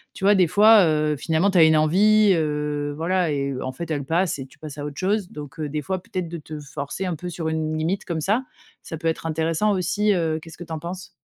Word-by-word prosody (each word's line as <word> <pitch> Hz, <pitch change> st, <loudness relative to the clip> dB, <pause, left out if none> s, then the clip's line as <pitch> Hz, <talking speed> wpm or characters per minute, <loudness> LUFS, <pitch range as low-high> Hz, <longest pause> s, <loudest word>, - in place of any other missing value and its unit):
tu 195 Hz, -, -4 dB
vois? 205 Hz, +1 st, +6 dB
Des 185 Hz, -2 st, +5 dB
fois, 210 Hz, +2 st, +6 dB
heu, 155 Hz, -1 st, +1 dB
finalement 165 Hz, +6 st, +1 dB
tu 190 Hz, -, +1 dB
as 165 Hz, -, +8 dB
une 160 Hz, 0 st, +5 dB
envie, 200 Hz, +7 st, +4 dB
heu, 150 Hz, -2 st, -1 dB
voilà 175 Hz, +1 st, 0 dB
et 140 Hz, -1 st, -2 dB
en 130 Hz, -, -3 dB
fait 165 Hz, +6 st, -7 dB
elle 145 Hz, -2 st, -1 dB
passe 170 Hz, +3 st, 0 dB
et 135 Hz, -, -6 dB
tu 130 Hz, -, -21 dB
passes 150 Hz, -2 st, -9 dB
à 145 Hz, -, -5 dB
autre 145 Hz, -1 st, -7 dB
chose. 195 Hz, 0 st, 0 dB
Donc 150 Hz, +1 st, -9 dB
heu, 150 Hz, -1 st, -3 dB
des 150 Hz, +1 st, -3 dB
fois 185 Hz, +5 st, -3 dB
peut-être 180 Hz, -3 st, -4 dB
de 170 Hz, -, -5 dB
te 155 Hz, 0 st, -8 dB
forcer 145 Hz, +5 st, -5 dB
un 175 Hz, -, -2 dB
peu 180 Hz, +3 st, -6 dB
sur 165 Hz, -2 st, -3 dB
une 155 Hz, 0 st, -2 dB
limite 170 Hz, +5 st, -1 dB
comme 165 Hz, -2 st, -3 dB
ça, 210 Hz, -, +1 dB, 0.4 s
ça 160 Hz, -, -6 dB
peut 165 Hz, -, -2 dB
être 165 Hz, 0 st, -2 dB
intéressant 165 Hz, +6 st, 0 dB
aussi, 200 Hz, +3 st, +1 dB
heu, 165 Hz, -4 st, 0 dB
qu'est-ce 160 Hz, 0 st, -13 dB
que -, -, -6 dB
tu 165 Hz, -, -13 dB
en 160 Hz, -, -2 dB
penses? 180 Hz, +3 st, -7 dB
160 Hz, 260 wpm, -23 LUFS, 150-185 Hz, 0.4 s, as